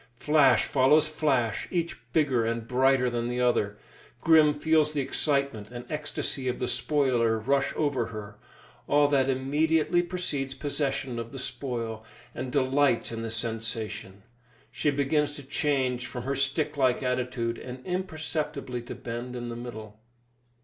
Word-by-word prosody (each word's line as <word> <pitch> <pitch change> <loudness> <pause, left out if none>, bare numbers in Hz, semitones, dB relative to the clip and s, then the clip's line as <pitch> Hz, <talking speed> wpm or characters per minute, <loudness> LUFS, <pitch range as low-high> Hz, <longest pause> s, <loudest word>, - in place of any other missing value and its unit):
Flash 145 -1 +4
follows 145 +4 +4
flash, 135 -8 0
each 170 -2 -3
bigger 140 -7 +2
and 115 0 -2
brighter 130 +1 +3
than 120 -1 -1
the 125 0 -2
other. 105 -4 +1 0.4
Grim 155 -2 +5
feels 155 0 +3
the 145 - 0
excitement 140 -6 0
and 120 0 -8
ecstasy 145 -3 -2
of 125 - -1
the 125 - -2
spoiler 125 -8 +2
rush 135 +5 +1
over 140 -6 0
her 105 -2 -8 0.5
all 145 0 +4
that 135 -2 +3
immediately 155 +5 +2
precedes 170 -7 -3
possession 135 -3 -2
of 115 0 -6
the 135 - -7
spoil 120 -4 -3 0.3
and 130 0 -5
delights 135 -2 +2
in 115 0 -4
the 115 - -3
sensation. 110 -3 -4 0.5
She 150 - 0
begins 145 +1 +1
to 145 - -9
change 130 -3 0
from 125 -2 -6
her 135 +2 -1
stick 140 +2 0
like 130 -1 +2
attitude, 125 -2 -1
and 125 0 -9
imperceptibly 155 -8 -3
to 120 - -8
bend 120 +1 -6
in 120 -1 -5
the 120 - -5
middle. 110 -3 -8
130 Hz, 150 wpm, -28 LUFS, 120-145 Hz, 0.5 s, Grim